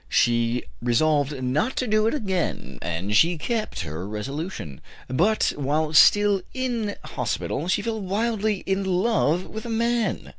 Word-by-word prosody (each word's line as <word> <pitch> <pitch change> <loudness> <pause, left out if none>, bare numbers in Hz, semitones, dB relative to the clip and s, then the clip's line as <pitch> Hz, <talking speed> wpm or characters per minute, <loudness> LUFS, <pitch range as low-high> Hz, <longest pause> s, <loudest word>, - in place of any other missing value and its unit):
She 120 0 +2 0.2
resolved 140 +2 +1
not 150 - 0
to 255 - 0
do 215 -1 +2
it 230 - +1
again, 185 - -3
and 85 +5 -2
she 170 +8 +4
kept 220 - -2
her 80 +3 -5
resolution. 110 - -5 0.3
But 185 - +2
while 150 +2 -1
still 205 +4 +6
in 235 -5 -2
hospital 155 - -3
she 185 - +1
fell 225 -2 -2
wildly 210 +1 -1
in 195 0 0
love 185 -3 +1
with 220 0 -7
a 235 - -6
man. 230 0 0
180 Hz, 145 wpm, -24 LUFS, -, 0.3 s, still